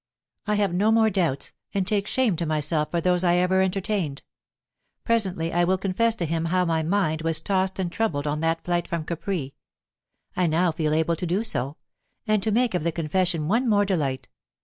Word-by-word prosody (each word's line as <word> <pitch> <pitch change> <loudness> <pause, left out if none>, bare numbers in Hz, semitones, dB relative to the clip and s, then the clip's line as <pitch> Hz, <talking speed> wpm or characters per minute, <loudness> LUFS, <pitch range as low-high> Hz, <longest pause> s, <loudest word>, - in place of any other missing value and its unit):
"I 210 - +2
have 205 -3 +1
no 205 +5 +2
more 225 -1 +4
doubts, 170 -8 -1 0.2
and 195 -2 +1
take 205 +1 0
shame 250 -7 +2
to 170 - -2
myself 155 0 0
for 170 - -1
those 180 +1 +2
I 175 -1 +3
ever 180 +1 +3
entertained. 190 -5 -1 0.8
Presently 190 -8 0
I 175 +1 +3
will 185 +2 +2
confess 205 +4 0
to 175 - -2
him 165 +1 -1
how 180 +2 +1
my 165 -1 +1
mind 160 -2 0
was 165 0 +1
tossed 190 -1 0
and 185 -3 -2
troubled 170 -8 -1
on 150 0 -1
that 165 +1 0
flight 175 -1 -1
from 170 -2 -3
Capri; 170 -5 -3 0.8
I 180 -1 +2
now 165 +2 +2
feel 155 -1 0
able 160 +1 +1
to 180 - -3
do 185 +6 0
so, 140 - -2 0.5
and 215 -2 +2
to 220 - 0
make 240 +1 +2
of 180 - 0
the 170 - 0
confession 165 0 0
one 235 +6 +1
more 205 -1 +3
delight. 145 -9 -1
180 Hz, 200 wpm, -25 LUFS, 160-200 Hz, 0.8 s, more